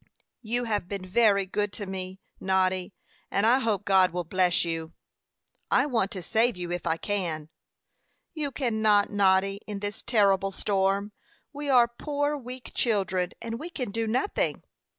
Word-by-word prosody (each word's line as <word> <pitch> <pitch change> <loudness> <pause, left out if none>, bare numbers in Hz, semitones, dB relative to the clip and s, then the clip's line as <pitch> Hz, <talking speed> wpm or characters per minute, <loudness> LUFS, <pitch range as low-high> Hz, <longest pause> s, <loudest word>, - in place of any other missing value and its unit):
"You 240 +1 -1
have 210 -6 -1
been 195 -1 -5
very 200 0 +3
good 205 +2 -2
to 205 - -4
me, 190 0 -6 0.2
Noddy; 185 0 0 0.3
and 200 - +1
I 245 +4 +5
hope 215 -5 -1
God 190 -2 +4
will 180 +1 -2
bless 180 +1 +2
you." 165 -1 -4 0.8
"I - - +4
want 230 -9 0
to 185 -3 -5
save 225 +3 +2
you 175 -1 -5
if 175 0 -3
I 160 - +1
can." 165 -6 -3 0.8
"You 305 -3 -2
cannot, 220 -6 +2
Noddy, 195 0 +2
in 210 -2 -4
this 205 0 -4
terrible 200 -4 +3
storm. 195 +1 0 0.4
We 290 0 -5
are 245 -3 +6
poor 290 +4 -2
weak 255 -2 -8
children, 190 -6 0
and 230 0 -4
we 325 +4 -6
can 255 -10 -4
do 225 +1 -2
nothing." 255 - 0
205 Hz, 160 wpm, -27 LUFS, 190-235 Hz, 0.8 s, are